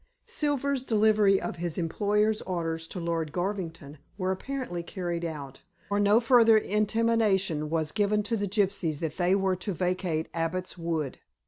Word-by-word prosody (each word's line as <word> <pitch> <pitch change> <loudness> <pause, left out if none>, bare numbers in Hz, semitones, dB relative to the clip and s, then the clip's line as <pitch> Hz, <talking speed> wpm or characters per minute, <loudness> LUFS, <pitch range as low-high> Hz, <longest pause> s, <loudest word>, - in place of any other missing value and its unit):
Silver's 280 -2 -1
delivery 215 -4 +3
of - - -5
his 170 -1 -3
employer's 210 +5 +1
orders 165 -3 -3
to 180 - -6
Lord 165 -2 -2
Garvington 170 -6 -4 0.2
were 185 -1 0
apparently 220 -3 -4
carried 175 -1 -4
out, 145 -5 -6 0.3
for 205 0 +1
no 205 +2 +5
further 230 -2 +6
intimation 210 -6 +1
was 160 -1 0
given 210 0 +1
to 225 +3 -1
the 205 -2 -1
gypsies 190 -6 0
that 160 0 -4
they 180 +1 +3
were 190 -1 +1
to 185 +2 -4
vacate 180 -2 -1
Abbot's 170 +3 -2
Wood. 165 -5 -3
185 Hz, 150 wpm, -28 LUFS, 165-210 Hz, 0.3 s, further